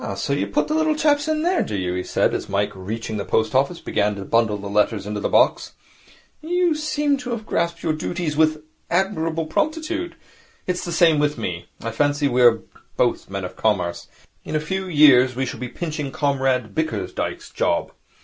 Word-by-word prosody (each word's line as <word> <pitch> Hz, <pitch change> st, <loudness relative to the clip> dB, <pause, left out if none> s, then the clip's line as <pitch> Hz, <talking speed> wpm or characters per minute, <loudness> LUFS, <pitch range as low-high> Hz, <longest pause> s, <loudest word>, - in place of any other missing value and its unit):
Ah, 100 Hz, -, -4 dB
so 100 Hz, +8 st, -2 dB
you 100 Hz, -8 st, 0 dB
put 100 Hz, -, 0 dB
the 305 Hz, -, -1 dB
little 315 Hz, 0 st, +2 dB
chaps 295 Hz, -1 st, +2 dB
in 310 Hz, 0 st, 0 dB
there, 360 Hz, +2 st, +2 dB
do 105 Hz, -, -3 dB
you?' 90 Hz, -2 st, -2 dB
he 90 Hz, -, -1 dB
said, -, -, +1 dB
as -, -, -3 dB
Mike, 100 Hz, +1 st, 0 dB
reaching 110 Hz, +3 st, -5 dB
the 100 Hz, -, -2 dB
post 110 Hz, +4 st, 0 dB
office, 140 Hz, +6 st, +1 dB
began 105 Hz, 0 st, 0 dB
to 100 Hz, -1 st, -7 dB
bundle 115 Hz, -1 st, +2 dB
the 100 Hz, 0 st, -7 dB
letters 105 Hz, 0 st, +1 dB
into 105 Hz, 0 st, -3 dB
the -, -, -1 dB
box. -, -, +2 dB, 0.7 s
'You 350 Hz, +1 st, +1 dB
seem 295 Hz, -2 st, 0 dB
to 250 Hz, -2 st, -7 dB
have 235 Hz, -3 st, -4 dB
grasped 170 Hz, -3 st, -1 dB
your 160 Hz, -, +1 dB
duties 155 Hz, 0 st, -3 dB
with 155 Hz, 0 st, +2 dB, 0.3 s
admirable 165 Hz, -3 st, 0 dB
promptitude. 320 Hz, -, -2 dB, 0.5 s
It -, -, 0 dB
is 180 Hz, -, -4 dB
the 175 Hz, -, -4 dB
same 165 Hz, -3 st, +4 dB
with 150 Hz, 0 st, +1 dB
me. 85 Hz, -1 st, -4 dB
I 115 Hz, -, -3 dB
fancy 145 Hz, +4 st, +1 dB
we 125 Hz, -1 st, +1 dB
are 115 Hz, -2 st, +5 dB, 0.3 s
both -, -, +1 dB
born -, -, -18 dB
men 95 Hz, -1 st, -3 dB
of 90 Hz, -, -8 dB
Commerce. 90 Hz, -6 st, -1 dB, 0.4 s
In -, -, -5 dB
a -, -, +3 dB
few 190 Hz, +5 st, -3 dB
years 135 Hz, -6 st, +6 dB
we 130 Hz, +1 st, -1 dB
shall 120 Hz, -, -6 dB
be 125 Hz, 0 st, -4 dB
pinching 150 Hz, -3 st, -4 dB
Comrade 130 Hz, -6 st, 0 dB
Bickersdyke's 160 Hz, 0 st, -3 dB
job. -, -, 0 dB
145 Hz, 205 wpm, -22 LUFS, -, 0.7 s, years